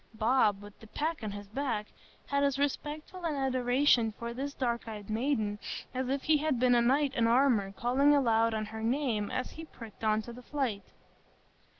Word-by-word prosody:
Bob, 215 -3 +2
with 205 0 -13
the 220 - -14
pack 310 +7 -2
on 215 - -3
his 205 0 -7
back, 225 -2 -2 0.4
had 280 0 0
as 280 -1 +2
respectful 300 +5 -3
an 320 -3 -1
adoration 255 -2 +2
for 235 0 -5
this 275 +4 -4
dark 240 -4 -2
eyed 210 -2 -7
maiden 220 -3 0 0.3
as 255 0 -2
if 275 0 -1
he 310 -1 +4
had 295 -4 0
been 250 0 +4
a 240 - +5
knight 275 +3 +2
in 230 -3 +2
armor 235 -5 +3
calling 265 +7 +3
aloud 230 -4 +3
on 215 0 -2
her 220 +1 -7
name 230 -3 0
as 255 - -3
he 325 - -9
pricked 230 -7 -12
on 215 0 +3
to 235 - -9
the 250 - -10
fight. 250 -7 -2
245 Hz, 195 wpm, -31 LUFS, 220-280 Hz, 0.4 s, a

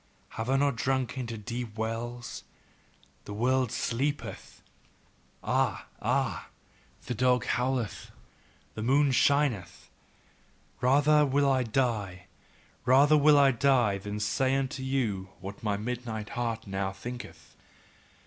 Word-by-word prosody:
Have 110 +2 -5
I 135 - +3
not 140 -4 +1
sunk 130 -1 0
into 120 -3 -4
deep 115 +1 -6
wells? 120 +2 -4 0.8
The 105 - -7
world 125 +1 +1
sleepeth 140 +5 -3 0.8
Ah! - - 0 0.2
Ah! - - -1 0.6
The 125 - -2
dog 125 0 +2
howleth, 125 -2 -1 0.6
the 110 - -6
moon 135 +4 +3
shineth. 130 - +1 0.9
Rather 145 +4 +4
will 140 0 +2
I 135 -1 +3
die, 110 -6 -1 0.6
rather 140 +5 +5
will 150 0 +6
I 140 -1 +6
die, 120 -5 +2
than 105 +2 -5
say 120 +6 +1
unto 135 -1 -2
you 115 -8 -1
what 100 +1 -8
my 105 -2 -1
midnight 110 -1 -4
heart 115 -2 -3
now 95 -1 -2
thinketh. 120 +6 -9
125 Hz, 120 wpm, -29 LUFS, 110-135 Hz, 0.9 s, will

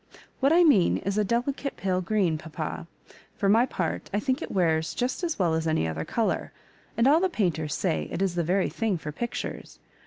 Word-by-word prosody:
What 275 +2 +3
I 345 +2 +6
mean 230 - +4
is 200 +2 -2
a - - +3
delicate 250 +6 -2
pale 185 -1 0
green, 185 -3 +1
papa. 160 +1 -6 0.5
For 200 - 0
my 225 +5 +5
X>art, 170 -9 -3
I 205 - 0
think 260 +3 -1
it - - -5
wears 160 -4 +1
just 255 +8 -2
as 335 -2 -1
well 175 -4 +2
as 160 0 0
any 155 - +1
other 80 0 -3
colour; 230 -2 -1 0.5
and 230 - +3
all 300 +4 +6
the 375 +1 +1
painters 160 - -1
say 75 -1 -1
it - - -3
is 190 -2 +1
the 175 -1 0
very 185 +4 +1
thing 220 -5 -1
for 150 -2 -6
pictures. 235 +10 -5
195 Hz, 210 wpm, -27 LUFS, 160-240 Hz, 0.5 s, I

